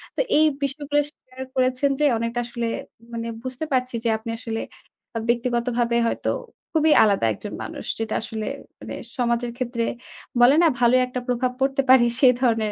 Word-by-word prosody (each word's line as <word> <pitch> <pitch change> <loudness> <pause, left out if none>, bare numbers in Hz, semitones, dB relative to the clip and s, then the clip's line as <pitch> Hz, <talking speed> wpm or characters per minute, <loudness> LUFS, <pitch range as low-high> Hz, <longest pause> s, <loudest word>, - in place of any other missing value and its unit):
তো - - +1 0.2
এই 310 - +6 0.2
বিষয়গুলো 290 +1 0
শেয়ার 255 -3 -11
করেছেন 255 +2 +2
যে, 300 - +3
অনেকটা 230 +1 -2
আসলে 235 -1 -3 0.5
মানে 230 0 -3 0.2
বুঝতে 255 +4 -4
পারছি 255 -1 0
যে, 235 - +1
আপনি 220 +1 -8
আসলে 225 -2 -4 0.5
বা 230 - -2
ব্যক্তিগতভাবে 240 0 +1
হয়তো - - -1 0.4
খুবই 315 -1 +4
আলাদা 200 - +2
একজন - - -8
মানুষ। - - -7
যেটা 225 -1 -2
আসলে 220 -1 -5 0.3
মানে - - -7 0.2
সমাজের 240 -1 0
ক্ষেত্রে 240 -2 -2 0.6
বলে 250 +4 +7
না? 340 - +6
ভালোই 250 +1 +5
একটা 250 0 -4
প্রভাব 250 0 0
পড়তে 270 +1 +2
পারে? 260 -2 +7
সেই 255 -2 +7
ধরনের 225 -4 +2
245 Hz, 165 wpm, -23 LUFS, 235-260 Hz, 0.6 s, বলে